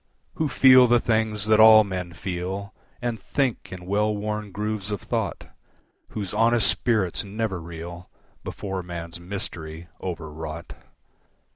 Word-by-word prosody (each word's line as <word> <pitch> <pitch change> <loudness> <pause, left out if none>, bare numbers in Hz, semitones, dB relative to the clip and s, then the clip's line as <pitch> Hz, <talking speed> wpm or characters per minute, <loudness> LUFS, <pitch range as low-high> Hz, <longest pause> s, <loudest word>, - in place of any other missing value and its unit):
Who 155 -2 -1
feel 130 -2 +7
the 120 0 +5
things 110 -2 0
that 110 0 +4
all 110 0 +9
men 90 -3 -5
feel, 95 +3 -4 0.3
And 120 -2 -2
think 135 -5 -2
in 90 -1 -8
well 105 +3 +1
worn 105 0 -3
grooves 105 0 -3
of 105 -2 -2
thought, - - -3 0.6
Whose 100 -4 -5
honest 115 -2 +3
spirits 105 -7 +1
never 100 -2 -3
reel 85 +2 -8 0.3
Before 95 -2 -4
man's 85 -1 -6
mystery, 85 -3 -6
overwrought. 80 -2 -6
100 Hz, 130 wpm, -25 LUFS, 85-110 Hz, 0.6 s, all